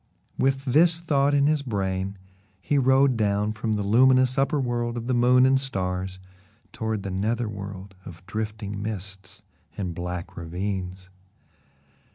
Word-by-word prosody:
With 135 0 0
this 165 +5 +4
thought 145 -4 +2
in 140 0 +4
his 150 0 +2
brain, 100 -5 -2 0.4
he 140 +8 +1
rode 135 0 +4
down 105 -1 +1
from 110 0 -2
the 105 - -1
luminous 130 +4 +4
upper 140 +2 +1
world 120 -2 -1
of 115 - -4
the 130 - 0
moon 125 +1 +5
and 135 0 +3
stars 95 -6 -3 0.6
toward 110 -3 -3
the 100 - -4
nether 110 +5 -1
world 100 -1 -7
of 90 0 -12
drifting 105 -1 -4
mists 100 -3 -6 0.3
and 90 -4 -3
black 90 +1 -5
ravines. 95 +2 -5
110 Hz, 145 wpm, -25 LUFS, 95-130 Hz, 0.6 s, moon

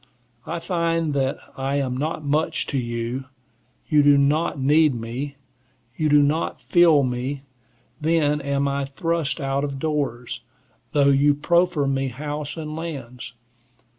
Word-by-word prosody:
I - - -2
find 165 -2 0
that 135 -1 0 0.2
I 135 +1 -2
am 135 -3 -1
not 150 +2 -3
much 150 +3 0
to 140 - -1
you; 120 +2 -3 0.6
you 150 -2 +4
do 145 0 +6
not 145 +3 +2
need 150 +1 +4
me; 120 +5 -5 0.6
you 155 -1 0
do 145 0 +6
not 150 +3 0
feel 165 -5 +4
me; 130 +2 -3 0.6
then 150 -2 +2
am 140 0 0
I 140 0 -1
thrust 165 +3 -2
out 135 0 -1
of 140 -2 -3
doors, 140 -5 -2 0.5
though 140 -2 +4
you 140 +1 +4
proffer 170 0 +2
me 135 0 0
house 145 +4 -5
and 155 -1 -5
lands. 130 -7 -7
145 Hz, 140 wpm, -23 LUFS, 135-155 Hz, 0.6 s, do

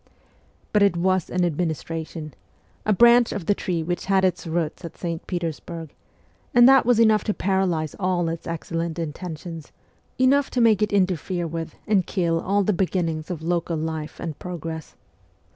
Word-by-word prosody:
But 210 - +4
it 200 -4 +4
was 185 0 +1
an 180 0 +1
administration 160 -1 -3 0.5
a - - +4
branch 235 +3 +6
of 200 -5 -4
the 205 - +3
tree 175 -4 -2
which 175 +2 -3
had 190 -1 +3
its 180 -1 -1
roots 165 +1 -2
at 170 - -8
St. 170 -2 -4
Petersburg 165 -2 -5 0.6
and 240 0 +8
that 270 -2 +6
was 245 -2 +4
enough 220 -3 +5
to 210 - 0
paralyse 185 -5 0
all 180 -3 +1
its 165 0 -4
excellent 165 0 -3
intentions, 165 0 -6 0.5
enough 270 +2 +3
to 250 - -2
make 220 -3 +4
it 210 - +1
interfere 185 -2 0
with 165 -1 -5
and 200 -5 +2
kill 170 -4 0
all 200 +2 +1
the 210 - +1
beginnings 170 -4 -1
of 165 -3 -5
local 170 -1 -1
life 155 -1 -4
and 160 -4 -5
progress. 165 -3 -6
175 Hz, 165 wpm, -24 LUFS, 165-195 Hz, 0.6 s, and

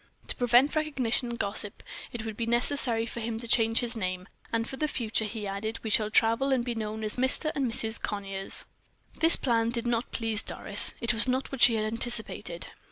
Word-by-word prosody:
To - - +1
prevent 245 +4 +3
recognition 265 -6 -1
and 235 - -5
gossip, 200 0 -2 0.3
it 230 -2 -6
would 220 -1 -5
be 230 +1 -3
necessary 240 -1 +1
for 235 - -7
him 225 0 -3
to 235 - -7
change 225 0 +3
his 240 0 -2
name; 185 -3 -4 0.2
"and 230 0 -1
for - - -6
the 305 +3 -1
future," 225 -5 -1
he 215 0 -6
added, 205 +3 -4
"we 220 - -3
shall 215 0 +2
travel 230 +5 +2
and 250 -3 +1
be 240 - -2
known 220 -1 -5
as 215 +2 -3
Mr. 260 +4 +2
and 265 -4 -1
Mrs. 220 0 +2
Conyers." 195 -2 -2 0.5
This 325 +1 +7
plan 230 -3 0
did 235 0 -4
not 240 0 -1
please 225 -2 +2
Doris. - - +2
It 235 - +2
was 225 +3 +2
not 260 +1 -1
what 270 -2 -6
she 235 - +7
had 215 -1 -1
anticipated. 225 -6 -3
230 Hz, 210 wpm, -28 LUFS, 220-245 Hz, 0.5 s, This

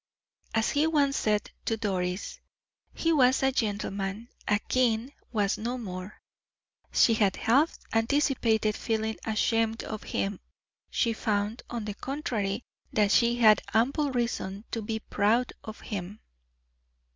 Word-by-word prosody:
As 225 0 +2
he 295 +2 +3
once 285 -3 +2
said 210 -1 0
to 225 - 0
Doris, 185 -3 -2 0.5
"He 330 0 +1
was 260 -3 +4
a 270 - +4
gentleman 205 -1 -2 0.2
a 205 - +4
king 245 +3 0 0.2
was 205 -3 +1
no 240 +3 -2
more." 185 -3 -7 0.7
She 230 - +5
had 205 -4 +2
half 275 +8 +2 0.2
anticipated 225 -3 +2
feeling 220 -1 -1
ashamed 225 +1 +1
of 215 -1 -5
him; 195 -1 -2 0.5
she 230 -2 +1
found, 210 +1 -1
on 235 -3 -4
the 210 - -3
contrary, 230 -5 -3 0.3
that 210 -2 +2
she 235 +2 +4
had 220 -3 +6
ample 275 +6 +2
reason 230 -4 -2
to 225 - -2
be 220 +1 -2
proud 220 +6 +1
of 220 0 -9
him. 200 0 -5
225 Hz, 135 wpm, -28 LUFS, 205-245 Hz, 0.7 s, had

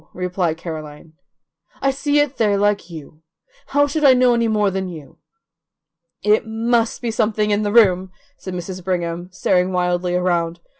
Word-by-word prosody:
replied 180 -2 -2
Caroline. 155 -2 -8 0.7
"I 275 - +1
see 285 +2 0
it 290 -2 +1
there 210 -3 +2
like 205 -2 0
you. 155 -1 -11 0.5
How 285 0 +3
should 300 +2 -3
I 265 -2 +7
know 250 -1 +4
any 235 -1 +1
more 210 -2 +1
than 190 0 -3
you?" 155 -6 -11 1.0
"It 210 +1 +3
MUST 230 +2 0
be 235 - -1
something 215 -1 0
in 205 +1 +1
the 205 -1 -1
room," 190 -5 +4 0.3
said 185 -8 -8
Mrs. 180 +1 -6
Brigham, 175 -1 -3
staring 180 0 +1
wildly 180 0 0
around. 175 -2 0
190 Hz, 160 wpm, -20 LUFS, 175-225 Hz, 1.0 s, I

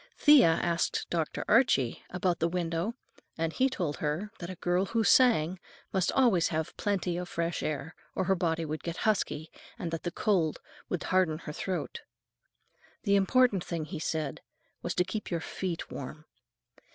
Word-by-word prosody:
Thea 295 - +7 0.2
asked 170 -1 0
Dr. 165 -3 -1
Archie 215 - +3
about 180 -1 0
the 165 - +2
window, 170 +4 -2 0.4
and 165 0 -1
he 265 +1 +3
told 170 - -2
her 155 +10 -2
that 175 -1 -6
a 185 - -5
girl 180 +2 +1
who 230 +2 +1
sang 190 -8 +4 0.3
must 190 -2 +2
always 230 -11 +4
have 160 0 -3
plenty 185 -4 -1
of 180 0 -4
fresh 170 0 -2
air, 150 +1 -3 0.2
or - - +1
her 190 - +3
voice 165 -2 0
would 155 0 -4
get 170 0 -4
husky, 175 -7 0 0.3
and 170 - -4
that 165 -1 -3
the 175 - -2
cold 175 -4 +1 0.3
would 180 - -2
harden 185 -4 +2
her 150 -2 -7
throat. 185 +3 -3 1.0
The 200 -2 +3
important 200 -1 +3
thing, 165 -3 -3
he 160 0 -6
said, 155 -3 -2 0.4
was - - -3
to 180 - +3
keep 210 +2 -4
your 170 - -1
feet 170 +1 -4
warm. 155 +3 -7
175 Hz, 170 wpm, -30 LUFS, 160-195 Hz, 1.0 s, Thea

